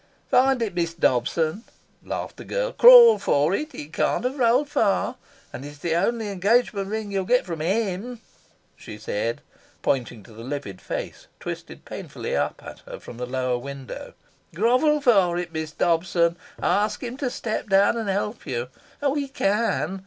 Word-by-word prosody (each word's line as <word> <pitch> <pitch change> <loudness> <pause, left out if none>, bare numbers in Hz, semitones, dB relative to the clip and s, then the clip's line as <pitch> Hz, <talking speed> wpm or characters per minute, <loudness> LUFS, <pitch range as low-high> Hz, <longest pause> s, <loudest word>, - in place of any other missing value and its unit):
"Find 260 -1 +4
it, 215 - -3
Miss 170 -1 -2
Dobson," 160 - +1 0.4
laughed - - -5
the - - -9
girl. - - -2
"Crawl 480 -2 +9
for 145 +5 +2
it. 300 +9 -3
It 150 +2 -9
can't - - 0
have 260 +3 -2
rolled 250 +4 +3
far, 250 -1 +1 0.4
and 125 - -7
it's 145 +1 -9
the 160 +3 -2
only 225 +6 0
engagement 200 +1 +1
ring 215 0 -4
you'll 195 -1 0
get 250 +6 +2
from 165 -3 -5
HIM," 205 +6 -2 0.6
she - - -10
said, - - -3 0.4
pointing 120 -5 -1
to 115 - -16
the 115 +1 -10
livid 125 -8 -6
face - - -6
twisted - - -7
painfully - - -5
up - - -2
at - - -9
her - - -8
from 120 - -11
the 125 0 -4
lower 125 -1 -1
window. 140 0 -8 0.4
"Grovel 255 - +3
for 195 -9 +4
it, 175 -1 -4
Miss 160 -1 -4
Dobson. 170 +1 +1 0.3
Ask 210 +5 +1
him 245 0 -4
to 275 -3 -1
step 220 -3 -4
down 195 +3 +4
and 225 -3 -3
help 205 +3 -2
you. 125 -1 -3 0.3
Oh, 280 -1 +2
he 285 -1 -2
can! 200 - 0
195 Hz, 170 wpm, -24 LUFS, 160-245 Hz, 0.6 s, Crawl